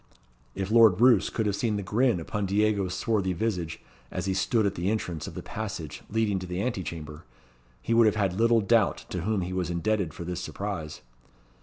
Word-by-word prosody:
If 95 +1 -3
Lord 110 -5 +6
Roos 125 0 +5
could 110 - -2
have 100 -2 +1
seen 110 0 0
the 100 - -3
grin 115 +1 +2
upon 100 +4 -3
Diego's 100 -2 +1
swarthy 100 -3 0
visage, 90 -4 -2 0.3
as - - -4
he 95 - 0
stood 110 +3 +1
at 100 - +1
the 90 +1 -1
entrance 90 -7 -3
of - - -8
the - - -6
passage 95 -9 -6
leading 105 -3 +1
to 90 - -7
the 90 +1 -3
ante 115 -2 -1
chamber, 75 -3 -7 0.6
he 115 - 0
would 115 -1 +6
have 105 - +2
had 100 -4 +1
little 115 +3 +3
doubt 110 0 +2
to 90 - -3
whom 105 +2 0
he 90 +1 -4
was 90 -2 -1
indebted 90 0 0
for 85 - -8
this 90 +1 -4
surprise. 80 -2 -5
100 Hz, 205 wpm, -27 LUFS, 90-110 Hz, 0.6 s, Lord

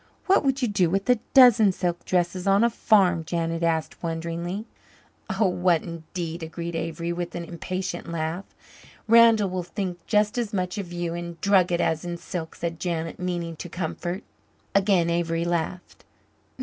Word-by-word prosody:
"What 385 - +4
would 270 -1 +1
you - - +3
do 185 -5 +2
with 195 +5 -1
a 245 - +3 0.2
dozen 240 -6 +8
silk 175 -1 -3
dresses 180 +1 0
on 195 +3 +4
a 235 - +3
farm?" 190 -7 +3
Janet 165 +1 -2
asked 165 -2 -1
wonderingly. 170 +4 -3 0.7
"Oh 215 - +4
what 180 -2 +2
indeed?" 170 0 -6
agreed 170 +1 -5
Avery, 165 +1 -3
with 175 0 -5
an 170 -1 -4
impatient 175 0 -5
laugh. 165 +3 -3 0.6
"Randall 225 -3 +6
will 185 0 -2
think 180 -1 -5
just 210 +2 +2
as 225 -3 -3
much 185 0 -2
of 180 -3 -6
you 175 -1 -3
in 170 0 -5
drugget 180 -2 +3
as 160 -1 0
in 175 -1 -4
silk," 170 -2 -6
said 165 -1 -4
Janet, 165 -1 -3
meaning 175 -2 -3
to 175 - -7
comfort. 175 +3 -4 0.5
Again 195 -3 +3
Avery 170 0 0
laughed. 175 +1 -3
175 Hz, 160 wpm, -25 LUFS, 170-195 Hz, 0.7 s, dozen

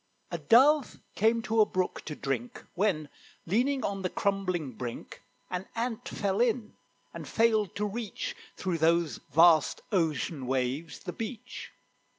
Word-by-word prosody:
A - - -3
Dove 275 +4 +5
came 225 +2 +2
to 220 0 +3
a - - +7
brook 185 -1 -1
to 150 - -5
drink, 130 -4 -4
When, 175 -6 +1 0.4
leaning 255 +9 +1
on 195 -1 -2
the 185 - -1
crumbling 185 -8 -1
brink, 120 0 -7 0.3
An 180 +1 -3
Ant 230 -1 -3
fell 200 +1 0
in, 235 -2 +1 0.4
and - - -7
failed 220 -4 +2
to 210 - -1
reach, 215 +1 -4 0.2
Through 180 -3 -1
those 165 -4 +2
vast 165 +1 +5
ocean 155 - 0
waves, 135 +5 -1
the - - -5
beach. 225 0 -6
190 Hz, 145 wpm, -29 LUFS, 155-225 Hz, 0.4 s, a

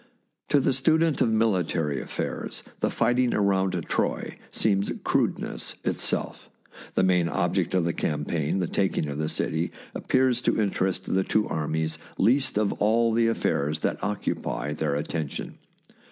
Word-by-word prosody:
To 145 - +5
the 135 - +2
student 160 +4 +2
of 115 - +4
military 90 -9 +1
affairs - - -4 0.2
the - - +1
righting 125 0 +3
around 95 -2 +2
Troy - - -1
seems 100 -2 +1
crudeness - - -1
itself. - - -2 0.5
The - - +3
main 90 -2 +3
ob 90 -1 0
ject 95 -1 0
of 90 -3 +2
the 85 - 0
campaign, 75 +2 -1
the 90 - +1
taking 95 -3 0
of 70 +1 -4
the 75 - -1
city, 80 +2 -1 0.2
ap - - -7
pears 130 -2 +3
to - - +1
interest 95 -2 0
the 95 0 +3
two 105 +2 +1
armies 80 0 -2 0.2
least 125 +4 +3
of 105 -2 +2
all 115 +2 +3
the 115 0 +3
affairs 75 -9 0
that - - -1
occupy 90 -8 -2
their 75 -1 -1
attention. 75 0 -4
95 Hz, 155 wpm, -26 LUFS, 80-115 Hz, 0.5 s, To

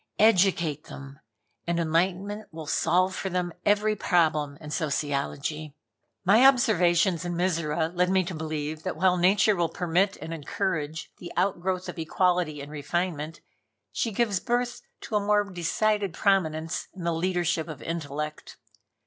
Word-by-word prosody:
Educate 180 -8 +3
them, 140 -1 -10 0.5
and 170 0 0
enlightenment 185 +6 -1
will 160 -1 -8
solve 180 +5 +2
for 190 - -3
them 180 -1 -2
every 210 +1 +3
problem 155 -7 +1
in 150 -2 -9
Sociology." 150 0 -2 0.5
My 210 +7 +6
observations 185 - +4
in 175 -1 -3
Mizora 165 -3 0
led 180 +1 +2
me 190 0 +3
to 180 +1 -5
believe 155 -1 -4
that 185 +1 -3
while 180 +1 +3
Nature 195 +4 +4
will 170 -2 +1
permit 185 +3 +1
and 160 +2 -6
encourage 160 -2 -3
the 175 - -8
outgrowth 185 -1 0
of - - -6
equality 170 -2 +1
in 145 +1 -9
refinement, 155 +1 -3 0.5
she 230 - -1
gives 205 -3 +1
birth 245 +1 -1 0.2
to 215 - -5
a - - +4
more 205 0 +3
decided 200 +1 -1
prominence 165 -5 0
in 185 - -7
the 170 0 0
leadership 175 -1 0
of 155 -4 -8
intellect. 150 -2 -5
175 Hz, 145 wpm, -27 LUFS, 155-190 Hz, 0.5 s, My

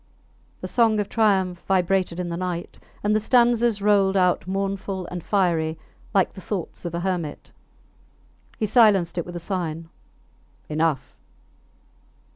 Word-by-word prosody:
The - - -4
song 225 -3 +3
of 205 - -2
triumph 190 -5 +2
vibrated 185 -1 +1
in 180 -1 -3
the 170 - -3
night, 175 -1 -4 0.2
and 210 +1 +2
the - - +3
stanzas 235 -2 +3
rolled 200 -2 +3
out 180 -1 +2
mournful 195 0 -3
and 175 -2 -5
fiery 165 -5 +1 0.3
like 195 -4 +2
the 190 - -10
thoughts 185 -1 -5
of 170 -1 -3
a 170 - -2
hermit. 175 -5 -3 1.1
He 220 - 0
silenced 195 -7 +4
it 170 - -4
with 175 - -8
a - - -2
sign, 165 -3 -4 0.8
Enough! 155 -4 -1
185 Hz, 140 wpm, -24 LUFS, 170-205 Hz, 1.1 s, silenced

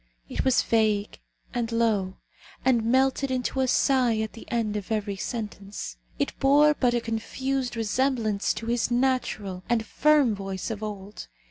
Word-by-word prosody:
It - - -2
was 260 -2 +3
vague 215 -2 +1 0.3
and 235 -2 -2
low, 215 -5 +1 0.5
and 245 -4 +3
melted 265 +3 +2
into 255 +1 -1
a 260 - +2
sigh 250 -3 +3
at 220 - -4
the 225 - -12
end 230 -4 -1
of 210 +1 -5
every 210 -2 -1
sentence. 200 - -5 0.2
It - - -1
bore 290 +2 +5
but 250 -4 +1
a 240 - +1
confused 250 +3 -2
resemblance 225 -2 0
to 230 - -6
his 235 0 0
natural 240 -7 0
and 230 -2 +1
firm 295 -1 +3
voice 195 +1 -4
of 215 -1 -5
old. 205 -1 -7
230 Hz, 155 wpm, -26 LUFS, 210-260 Hz, 0.5 s, bore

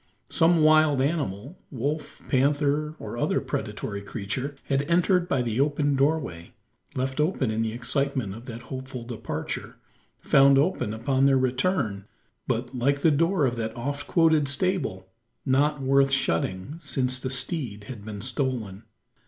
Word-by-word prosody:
Some 165 -1 +4
wild 155 -2 +5
animal 140 - -2
wolf, 145 +4 -4
panther, 145 +3 +1
or - - -6
other - - +1
predatory 100 0 -4
creature 110 +7 -4
had 135 0 +1
entered 180 +1 +3
by 130 -2 +1
the 115 0 -2
open 145 0 +2
doorway, 135 - -1 0.4
left 130 +2 -2
open 150 - +1
in 110 +1 -1
the 110 -1 -1
excitement 130 -2 -1
of 115 +5 -11
that 120 -1 -7
hopeful 130 -2 -6
departure 115 -1 -5 0.4
found 140 0 +5
open 145 - +1
upon 135 +4 +2
their 135 -1 +4
return 130 - 0 0.4
but, 120 +3 -2
like 140 +3 +1
the 160 - +6
door 165 +2 +2
of 125 -2 -1
that 110 0 -3
oft 140 +4 -4
quoted 160 -4 +3
stable, 140 - -1 0.4
not 145 +2 +2
worth 135 +1 +4
shutting, 95 - -1
since 130 -4 -1
the 130 - -3
steed 130 - -2
had 110 -1 -9
been 105 -1 -7
stolen. 120 -6 -2
135 Hz, 145 wpm, -26 LUFS, 120-150 Hz, 0.4 s, the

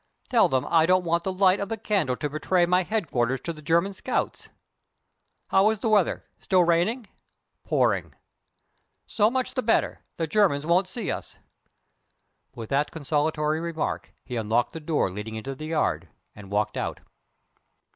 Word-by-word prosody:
Tell - - +5
them 130 -1 0
I 165 -1 +4
don't 185 0 +3
want 170 0 +1
the 190 - 0
light 185 0 +3
of 200 - -3
the 225 - -2
candle 190 - 0
to 150 - -3
betray 155 +5 +1
my 180 +1 +3
headquarters 135 - -1
to 170 - -4
the 155 - -12
German 170 +6 +1
scouts. 190 - -3 1.0
How 195 +2 +4
is 220 - 0
the 220 +2 -2
weather? 205 -4 +2 0.2
Still 185 -1 +3
raining?" 175 +9 +1 0.6
"Pouring." - - 0 0.9
"So 210 0 +2
much 255 +1 -1
the 255 - -1
better. 225 -2 +1 0.2
The 165 - 0
Germans 160 -5 +2
won't 180 +3 +2
see 225 +1 -3
us." - - -6 1.2
With 115 -2 -8
that 140 +2 +1
consolatory 150 0 -1
remark 165 -2 -3
he 125 - -5
unlocked 115 +2 0
the 160 - -5
door 150 - 0
leading 105 +3 -6
into 120 +5 -5
the 155 +3 -8
yard, 155 -1 -1 0.3
and 105 -2 -12
walked 105 +1 -1
out. - - -3
165 Hz, 165 wpm, -26 LUFS, 145-190 Hz, 1.2 s, Tell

